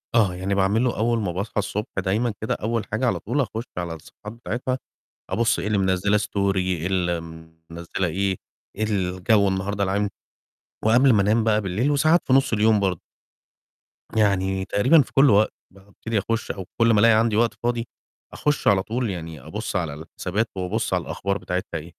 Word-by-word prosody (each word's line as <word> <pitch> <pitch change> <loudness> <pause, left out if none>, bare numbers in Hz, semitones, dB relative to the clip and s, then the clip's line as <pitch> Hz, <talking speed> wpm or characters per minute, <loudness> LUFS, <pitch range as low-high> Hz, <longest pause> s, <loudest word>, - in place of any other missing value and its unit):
آه، 100 -6 +3
يعني 95 +2 -2
باعمله 105 +6 +1
أول 115 +1 +1
ما 100 -5 -2
باصحى 100 +6 -5
الصبح 105 +1 -3
دايمًا 105 +5 0
كده 110 - -1
أول 115 0 -2
حاجة 110 +5 0
على - - 0
طول، 125 +7 -1
أخُشّ 115 -3 -3
على 85 -2 -3
الصفحات 80 +6 -11
بتاعِتها 120 +2 -3 0.5
أبُصّ 115 0 +1
إيه - - -3
اللي 105 -1 +1
مِنزّله 95 +2 +2
story 100 -2 0
إيه 90 -2 -1
اللي 90 -3 0
م 80 0 -13
مِنزّله 85 +3 -3
إيه؟ 95 +3 -1 0.4
إيه 110 - -2
الجو 100 0 +1
النهارده 95 +1 -1
العام، 100 +1 0 0.8
وقبل 125 +4 +5
ما 105 - +4
أنام 110 +3 +2
بقى 110 -1 +2
بالليل، 105 +9 0
وساعات 155 +4 +4
في 130 - +3
نُص 135 -2 +3
اليوم 110 0 +4
برضه. 95 -4 -1 1.1
يعني 95 -3 +1
تقريبًا 130 +13 +4
في - - -6
كل 135 +1 +6
وق 105 +1 +5 0.2
بابتدي 100 +3 -5
أخُشّ، 115 +3 -2
أو 95 - -7
كل 115 0 +4
ما 105 - +4
الاقي 115 +2 +6
عندي 110 0 +2
وقت 115 +1 +2
فاضي، 120 0 -1 0.5
أخُشّ 150 -1 -1
على 95 -2 +4
طول 120 +2 -2
يعني 80 -5 -6
أبُصّ 100 - -5
على 85 -5 -1
الحسابات 90 +8 -3
وأبُصّ 90 -1 -2
على - - +2
الأخبار 100 +1 -2
بتاعِتها 90 -2 -4
إيه. 80 +2 -12
100 Hz, 185 wpm, -23 LUFS, 95-115 Hz, 1.1 s, كل